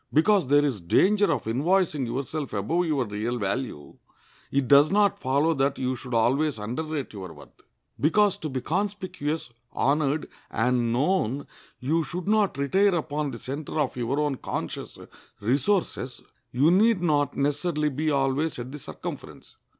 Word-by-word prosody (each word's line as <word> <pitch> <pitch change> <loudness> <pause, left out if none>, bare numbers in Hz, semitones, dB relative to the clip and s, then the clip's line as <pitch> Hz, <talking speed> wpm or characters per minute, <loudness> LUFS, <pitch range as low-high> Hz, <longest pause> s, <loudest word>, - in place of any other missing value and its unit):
Because 180 +1 +3
there 145 +2 +4
is 125 -9 -2
danger 205 - +3
of 130 - -1
invoicing 150 - +1
yourself 135 +3 -4
above 160 - 0
your 140 -5 +1
real 110 +3 -3
value, 100 - -4 0.5
it 135 -2 +1
does 140 +3 +7
not 205 0 +3
follow 140 +5 +2
that 135 -1 0
you 130 0 -1
should 125 -1 -5
always 135 +5 +2
underrate 140 +7 -4
your 95 -4 -7
worth. 75 - -16 0.4
Because 195 - +3
to 160 -6 -5
be 130 -2 -3
conspicuous, 180 -5 -3 0.2
honored, 150 +2 +1 0.2
and 120 0 +1
known 140 - 0 0.3
you 155 +6 +1
should 175 +3 -5
not 210 -7 +2
retire 190 +8 +3
upon 150 -2 -2
the 120 - -6
center 140 +5 -5
of 145 -4 0
your 125 +3 -1
own 145 -3 0
conscious - - -5 0.4
resources, 130 - 0 0.3
you 140 +7 +4
need 205 0 +4
not 145 -4 +1
necessarily 150 +2 0
be 150 +3 -1
always 140 +2 0
at 125 +1 -6
the 150 - -7
circumference. - - -8
145 Hz, 150 wpm, -26 LUFS, 125-165 Hz, 0.5 s, does